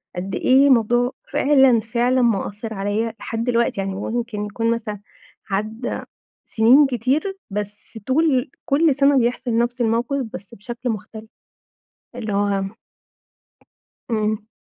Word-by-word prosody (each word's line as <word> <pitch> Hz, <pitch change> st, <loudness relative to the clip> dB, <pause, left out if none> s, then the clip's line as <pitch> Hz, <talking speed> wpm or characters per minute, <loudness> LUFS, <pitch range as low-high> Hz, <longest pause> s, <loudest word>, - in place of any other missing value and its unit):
قد 185 Hz, +2 st, -4 dB
إيه 270 Hz, +2 st, +4 dB
الموضوع 240 Hz, 0 st, +3 dB, 0.2 s
فعلًا 270 Hz, -4 st, +4 dB
فعلًا 240 Hz, +3 st, +1 dB
مأثر 220 Hz, -1 st, -1 dB
عليَّ 205 Hz, +3 st, -1 dB
لحد 225 Hz, 0 st, -3 dB
دلوقتي، 235 Hz, -4 st, +1 dB
يعني 195 Hz, 0 st, -3 dB
ممكن 220 Hz, 0 st, -3 dB
يكون 230 Hz, +3 st, -1 dB
مثلًا 215 Hz, -3 st, -3 dB, 0.5 s
عدّى 215 Hz, +5 st, -3 dB, 0.5 s
سنين 250 Hz, +6 st, +5 dB
كتير 270 Hz, -, -1 dB
بس 210 Hz, +2 st, -6 dB
طول 270 Hz, -1 st, +2 dB
كل 305 Hz, 0 st, +3 dB
سنة 280 Hz, 0 st, +4 dB
بيحصل 240 Hz, -1 st, 0 dB
نفس 240 Hz, +1 st, 0 dB
الموقف 240 Hz, +4 st, 0 dB
بس 195 Hz, +4 st, -9 dB
بشكل 240 Hz, +4 st, -5 dB
مختلف. 220 Hz, +1 st, -7 dB, 0.9 s
اللي 220 Hz, -4 st, -4 dB
هو 200 Hz, -1 st, +1 dB, 1.5 s
إمم. 215 Hz, -1 st, -1 dB
230 Hz, 120 wpm, -21 LUFS, 210-255 Hz, 1.5 s, سنين